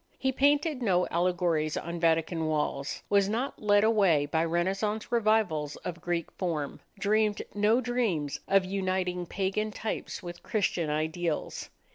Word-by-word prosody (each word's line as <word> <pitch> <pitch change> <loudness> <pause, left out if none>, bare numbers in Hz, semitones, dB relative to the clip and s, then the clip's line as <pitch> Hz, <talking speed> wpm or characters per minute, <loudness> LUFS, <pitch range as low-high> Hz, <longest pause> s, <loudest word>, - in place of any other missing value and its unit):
He 265 -1 0
painted 285 +1 +2
no 180 -6 +2
allegories 170 -3 +1
on 170 +1 -4
Vatican 165 0 +1
walls, 150 -2 -2
was 200 -1 +3
not 240 +6 -2
led 205 -1 +4
away 195 -10 +4
by 160 +3 0
Renaissance 195 +6 -1
revivals 215 -10 +1
of 175 -1 -7
Greek 170 -2 -2
form, 160 -6 -3 0.2
dreamed 210 +1 +1
no 210 +4 +3
dreams 220 - -1
of 195 -1 +4
uniting 185 -2 -1
pagan 195 +4 -1
types 215 +1 -5
with 175 0 -8
Christian 185 -6 0
ideals. 160 +2 -2
185 Hz, 135 wpm, -29 LUFS, 165-215 Hz, 0.2 s, led